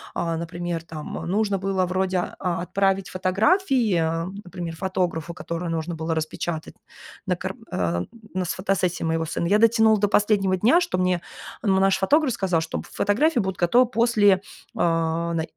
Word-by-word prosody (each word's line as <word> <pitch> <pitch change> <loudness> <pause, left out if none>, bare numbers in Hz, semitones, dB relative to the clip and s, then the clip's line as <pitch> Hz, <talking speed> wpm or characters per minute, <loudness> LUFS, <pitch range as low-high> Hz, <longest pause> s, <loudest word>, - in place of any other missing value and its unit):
Э, 165 -1 -1
например 170 0 -4
там, 155 -2 -7
э, - - -6
нужно 200 +2 0
было 190 -1 0
вроде, 185 +1 0 0.2
а, 175 -2 -1
отправить 195 +1 0
фотографии, 215 - +2 0.4
например, 175 -2 -6
фотографу, 170 -2 -2
которую 170 +1 -4
нужно 165 +1 -3
было 160 0 -2
распечатать 160 +1 -4 0.5
на - - +1
кар - - -5 0.2
а, 85 0 -1 0.3
на, 185 0 -1
с - - -2
фотосессии 185 -2 -1
моего 165 0 0
сына. 165 +2 -2
Я 205 +4 +4
дотянула 220 -2 +5
до 205 - +3
последнего 200 -3 +2
дня, 250 - +4
что 335 - -1
мне, 180 -1 +1 0.4
м, 200 - +2
ну, - - +3
наш 195 0 +3
фотограф 285 +5 +3
сказал, 185 -7 0
чтоб 165 - -4
фотографии 255 +7 +1
будут 190 -3 -2
готовы 235 +9 +4
после, 230 -4 +4
э, 190 - 0 0.4
най 165 0 0
185 Hz, 165 wpm, -24 LUFS, 170-205 Hz, 0.5 s, дотянула